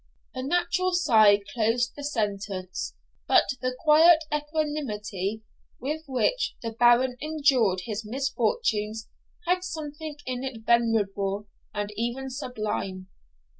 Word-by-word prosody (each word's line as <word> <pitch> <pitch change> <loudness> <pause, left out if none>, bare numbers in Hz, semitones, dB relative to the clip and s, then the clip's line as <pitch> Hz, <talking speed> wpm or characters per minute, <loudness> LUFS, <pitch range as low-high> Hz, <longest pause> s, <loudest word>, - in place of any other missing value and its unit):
A 255 - -4
natural 355 +5 +1
sigh 215 - +5
closed 240 +2 +1
the 290 - -8
sentence; 200 -8 -3 0.3
but - - +6 0.2
the 255 0 -1
quiet 320 +1 +7
equanimity 265 - -2 0.4
with 300 +5 -3
which 280 - 0
the 230 - -3
Baron 240 +2 +4
endured 275 -11 +2
his 215 +2 -4
misfortunes 225 - -1 0.4
had 360 +1 +1
something 310 -2 -6
in 255 0 -3
it 235 -5 -6
venerable 210 -4 +1 0.3
and 205 0 -4
even 240 +4 -3
sublime. 215 -8 -4
245 Hz, 110 wpm, -26 LUFS, 210-300 Hz, 0.4 s, quiet